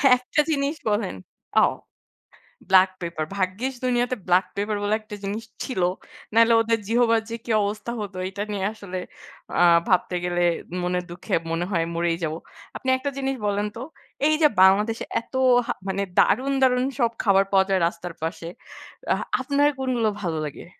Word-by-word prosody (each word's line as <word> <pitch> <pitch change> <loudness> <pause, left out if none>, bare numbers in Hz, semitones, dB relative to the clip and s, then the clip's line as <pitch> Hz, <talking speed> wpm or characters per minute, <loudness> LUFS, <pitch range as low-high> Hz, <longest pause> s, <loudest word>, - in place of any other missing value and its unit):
একটা 250 +4 0
জিনিস 285 +1 0
বলেন। 205 -2 -1 0.4
ও! - - +6 1.1
black 190 0 +6
pepper 170 -2 -3
ভাগ্যিস 200 +8 -1
দুনিয়াতে 245 0 +1
black 180 +1 +4
pepper 205 +1 -1
বলে 205 +1 +2
একটা 215 -1 -9
জিনিস 205 +3 -3 0.2
ছিল, 255 -8 -3 0.5
নাইলে 230 +1 +5
ওদের 225 0 +1
জিহবার 230 0 +3
যে 230 - -3
কী 235 - -3
অবস্থা 210 +3 -3
হতো 200 -2 -6
এটা 200 +1 -4
নিয়ে 195 -2 -2
আসলে 200 -4 -7 0.6
আ - - +4 0.3
ভাবতে 180 -1 +2
গেলে 175 0 0 0.4
মনের 180 0 -1
দুঃখে 175 - -3 0.2
মনে 165 +1 -1
হয় 170 -4 +1
মরেই 170 0 0
যাব। 155 -1 -1 0.4
আপনি 260 - -3
একটা 260 +2 -3
জিনিস 270 0 -1
বলেন 205 0 0
তো, 230 - -7 0.5
এই 310 - +3
যে 305 - +8
বাংলাদেশে 210 +4 +4 0.2
এত - - -28 0.3
হা - - 0
মানে 190 +1 -1 0.2
দারুন- 265 +4 +3
দারুন 250 -1 +4 0.2
সব 235 -2 +3
খাবার 195 -2 +4
পাওয়া 190 -1 +4
যায় 190 -1 +2
রাস্তার 170 0 -6
পাশে, 165 0 -4 0.6
অ্যাহ - - +1 0.2
আপনার 285 0 +2
কোনগুলো 250 -4 +1
ভালো 170 -4 -2
লাগে? 145 - -8
205 Hz, 165 wpm, -24 LUFS, 185-240 Hz, 1.1 s, যে